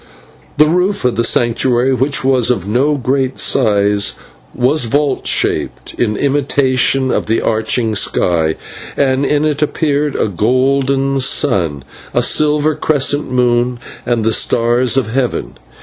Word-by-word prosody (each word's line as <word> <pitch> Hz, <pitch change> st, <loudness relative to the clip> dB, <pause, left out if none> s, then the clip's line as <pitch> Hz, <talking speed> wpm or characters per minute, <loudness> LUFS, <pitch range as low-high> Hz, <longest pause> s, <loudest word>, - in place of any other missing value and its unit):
The 150 Hz, -, +6 dB
roof 180 Hz, +2 st, 0 dB
of 125 Hz, -, +1 dB
the 115 Hz, -, 0 dB
Sanctuary, 120 Hz, +2 st, +1 dB
which 130 Hz, +3 st, 0 dB
was 130 Hz, -3 st, +2 dB
of 100 Hz, -7 st, -1 dB
no 135 Hz, +8 st, +1 dB
great 130 Hz, 0 st, -1 dB
size, 105 Hz, -4 st, +1 dB, 0.4 s
was 130 Hz, +2 st, +1 dB
vault 145 Hz, +5 st, -1 dB
shaped, -, -, -1 dB
in 105 Hz, -3 st, -1 dB
imitation 135 Hz, -2 st, +1 dB
of -, -, -2 dB
the 110 Hz, -, +1 dB
arching 110 Hz, +1 st, 0 dB
sky, 85 Hz, -5 st, 0 dB, 0.4 s
and 135 Hz, 0 st, +1 dB
in 150 Hz, +1 st, +1 dB
it 150 Hz, -1 st, -1 dB
appeared 150 Hz, -1 st, -1 dB
a -, -, 0 dB
golden 135 Hz, +6 st, 0 dB
sun, 95 Hz, -, 0 dB, 0.3 s
a -, -, +2 dB
silver 150 Hz, 0 st, +1 dB
crescent 145 Hz, -1 st, 0 dB
moon, 125 Hz, -1 st, +1 dB, 0.2 s
and 120 Hz, -2 st, -1 dB
the 110 Hz, 0 st, +1 dB
stars 120 Hz, +4 st, +1 dB
of 120 Hz, -5 st, -1 dB
heaven. 125 Hz, 0 st, -3 dB
130 Hz, 135 wpm, -14 LUFS, 115-140 Hz, 0.4 s, The